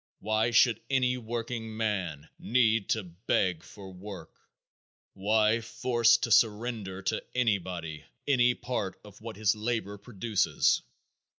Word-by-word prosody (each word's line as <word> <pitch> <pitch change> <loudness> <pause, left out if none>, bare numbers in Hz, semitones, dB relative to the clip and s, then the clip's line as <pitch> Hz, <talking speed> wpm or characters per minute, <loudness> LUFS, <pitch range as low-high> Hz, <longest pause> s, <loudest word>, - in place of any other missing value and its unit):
Why 110 +3 0
should 115 -1 +4
any 130 -2 +2
workingman 110 - -3
need 115 -3 +2
to 110 - +1
beg 90 -1 -1
for 95 0 -12
work? 90 -3 -10 0.8
Why 105 +3 +2
forced 115 0 +2
to 115 - -1
surrender 105 -4 +1
to - - -1
anybody 90 -9 -1 0.2
any 125 -3 +4
part 105 -7 -4
of 105 0 -15
what 115 0 -7
his 105 0 +2
labor 110 -2 -3
produces? 110 -1 +1
110 Hz, 115 wpm, -29 LUFS, 95-115 Hz, 0.8 s, should